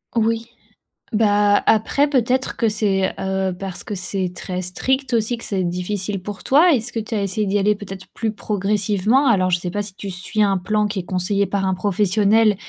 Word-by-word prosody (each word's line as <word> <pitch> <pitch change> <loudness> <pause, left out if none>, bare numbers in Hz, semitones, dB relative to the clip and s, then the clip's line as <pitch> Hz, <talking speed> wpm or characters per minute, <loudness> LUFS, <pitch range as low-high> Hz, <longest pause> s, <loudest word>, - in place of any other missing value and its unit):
Oui. 230 0 +1 0.7
Bah, 205 -1 +3
après 225 +6 +3
peut-être 255 -2 0
que 230 - +1
c'est, 200 -3 0
heu, 190 0 -1
parce 190 -2 -6
que 210 - -5
c'est 185 0 -2
très 180 0 -5
strict 260 +9 -1
aussi, 230 +1 +1
que - - -11
c'est 190 -3 -1
difficile 185 +2 -3
pour 205 -1 -7
toi. 320 +6 +5
Est-ce 245 -3 0
que 225 - -1
tu 220 +2 -7
as 210 - 0
essayé 200 +2 -1
d'y 200 +1 +1
aller 210 +2 +2
peut-être 195 -2 -9
plus 220 -1 -2
progressivement? 210 +4 +1
Alors, 185 -6 +3
je 175 -1 +2
sais 180 0 -4
pas 205 - -1
si 200 -2 -7
tu 200 -1 -6
suis 185 +4 -2
un 200 -2 +3
plan 210 +3 0
qui 200 -2 -3
est - - -4
conseillé 190 +3 0
par 200 -1 -1
un 190 - +1
professionnel, 205 +3 +2
205 Hz, 205 wpm, -21 LUFS, 190-220 Hz, 0.7 s, toi